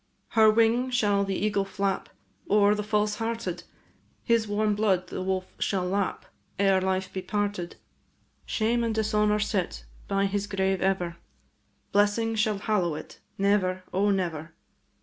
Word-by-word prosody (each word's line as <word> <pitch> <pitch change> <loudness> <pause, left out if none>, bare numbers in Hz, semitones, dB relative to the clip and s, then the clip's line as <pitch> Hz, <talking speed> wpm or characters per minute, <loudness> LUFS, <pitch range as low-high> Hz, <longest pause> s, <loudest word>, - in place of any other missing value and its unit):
Her 220 -1 +5
wing 230 +3 +3
shall 205 -5 +2
the 195 -1 -2
eagle 205 0 +1
flap 195 0 -2 0.4
O'er 205 0 +5
the 210 - -1
false 210 0 0
hearted; 225 -6 -3 0.6
His 230 -2 +2
warm 210 +1 +1
blood 200 -3 +1
the - - -4
wolf 185 0 -2
shall 190 -3 0
lap 195 +1 -1 0.3
Ere 195 -1 +3
life 190 0 -1
be 190 - -3
parted. 200 -2 -2 0.7
Shame 235 +2 0
and 225 -1 -1
dishonour 210 -1 +2
sit 190 - -2 0.2
By 195 0 +1
his 200 +1 -1
grave 190 -1 0
ever; 180 -3 0 0.7
Blessing 205 +3 +2
shall 215 -1 +1
hallow 185 -6 0
it, 155 - -9 0.2
Never, 195 -2 +1
O 200 +2 +2
never! 170 -5 -2
200 Hz, 145 wpm, -27 LUFS, 190-215 Hz, 0.7 s, Her